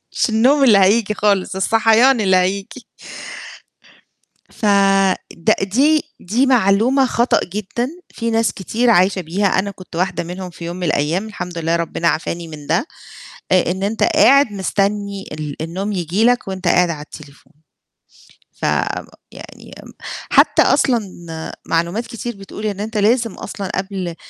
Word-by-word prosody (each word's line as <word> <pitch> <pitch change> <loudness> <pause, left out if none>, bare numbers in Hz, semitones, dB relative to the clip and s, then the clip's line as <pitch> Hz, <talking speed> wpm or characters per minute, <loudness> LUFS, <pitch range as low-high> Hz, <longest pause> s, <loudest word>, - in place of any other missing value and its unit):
مش - - +1
النوم 260 +6 +3
اللي 220 -6 +6
هييجي 210 +2 +3
خالص، 200 -3 0
الصَحيان 225 +5 +3
اللي 190 -3 +3
هييجيي. 190 +2 -1 1.7
ف - - -20 0.9
د - - +5
دي 280 +11 +2 0.2
دي 235 +9 +1
معلومة 250 +2 +3
خطأ 240 0 +1
جدًا، 210 +6 -4 0.3
في 230 -1 -2
ناس 225 0 +1
كتير 230 +6 0
عايشة 185 -1 +3
بيها، 185 +4 -1
أنا 200 +1 0
كنت 185 -3 -12
واحدة 180 0 -1
منهم 180 +2 -7
في 170 0 -11
يوم 175 +1 -5
من 180 - -4
الأيام 160 +6 0
الحمد 180 -5 -6
لله 165 +1 0
ربِّنا 170 0 -1
عَفاني 165 +1 -3
من 150 -2 -10
ده، 165 - 0 0.7
آآ 180 -2 +3
إن 190 +2 -4
أنت 215 +2 -1
قاعد 280 -6 +5
مستنّي 200 0 -2
ال 150 -2 -5
النوم 185 +6 -4
ييجي 185 +3 0
لك 245 -2 +2
وأنت 190 -1 -4
قاعد 180 0 +3
على 155 -3 -4
التليفون، 150 -1 -14 1.1
فم - - +1 0.5
يعني - - -12
م - - -13 0.4
حتّى - - +5
أصلًا 245 -3 +3 0.7
معلومات 170 +8 -1
كتير 240 0 -6
بتقول 200 +2 -8
إن 205 -2 -3
أنت 215 +1 -4
لازم 230 +1 +2
أصلًا 195 -1 -6
قبل 190 -3 -4
195 Hz, 150 wpm, -18 LUFS, 180-225 Hz, 1.7 s, اللي